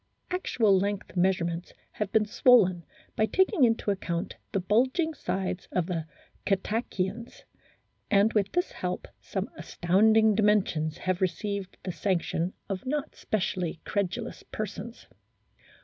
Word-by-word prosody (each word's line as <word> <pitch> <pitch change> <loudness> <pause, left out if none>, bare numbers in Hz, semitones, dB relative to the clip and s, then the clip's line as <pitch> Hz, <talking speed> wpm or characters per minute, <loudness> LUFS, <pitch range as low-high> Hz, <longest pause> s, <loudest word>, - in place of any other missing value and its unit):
Actual 230 - +2
length 200 +1 -1
measure 185 -1 +2
ments 170 +1 -4 0.2
have 210 -2 -3
been 220 -1 +3
swollen 205 -6 +4 0.3
by 215 - +2
taking 380 - +3
into 225 -3 +1
account 170 -3 -3 0.2
the 195 - +1
bulging 260 - +2
sides 185 - -3
of 180 -3 +1
the 165 -3 -3 0.4
Cetaceans, 205 +2 -2 0.7
and 205 +2 +4
with 200 -2 +1
this 355 +1 0
help - - -4
some - - -3
astounding 215 +5 +3
dimensions 200 -7 +2
have 185 0 -1
received 190 +2 -2
the 185 - -3
sanc 185 -1 0
tion 170 +3 -2
of 195 -2 -3
not 295 +2 -2
specially 180 -5 -2
credulous 200 -3 -2
persons. 215 +2 -6
200 Hz, 130 wpm, -28 LUFS, 185-220 Hz, 0.7 s, swollen